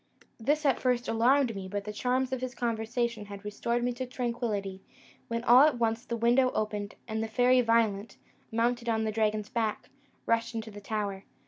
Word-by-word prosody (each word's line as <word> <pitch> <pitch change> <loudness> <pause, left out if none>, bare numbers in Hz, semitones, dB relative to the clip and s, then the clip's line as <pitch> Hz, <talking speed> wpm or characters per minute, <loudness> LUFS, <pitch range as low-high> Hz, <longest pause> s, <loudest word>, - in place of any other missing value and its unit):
This 295 +7 0
at 275 - +3
first 250 -1 0
alarmed 240 +1 +3
me, 190 -1 -5
but 200 +1 -3
the 210 +1 -6
charms 255 +3 0
of 260 - -2
his 255 0 -4
conversation 235 -1 -2
had 200 0 -9
restored 235 +3 -1
me 245 0 0
to 255 +1 -5
tranquillity, 230 -6 -3 0.5
when 230 0 -3
all 245 +2 +7
at 295 -3 +4
once 225 0 0
the 235 - -3
window 240 +3 +4
opened, 210 -1 -2
and 220 -1 -2
the 225 - -2
Fairy 250 +3 +4
Violent, 225 -3 +1 0.3
mounted 235 +1 0
on 220 -1 +1
the 220 - -1
dragon's 215 -1 0
back, 225 -3 -2 0.3
rushed 230 +1 0
into 220 -1 -4
the 205 0 -10
tower. 200 -2 -3
230 Hz, 190 wpm, -29 LUFS, 215-245 Hz, 0.5 s, all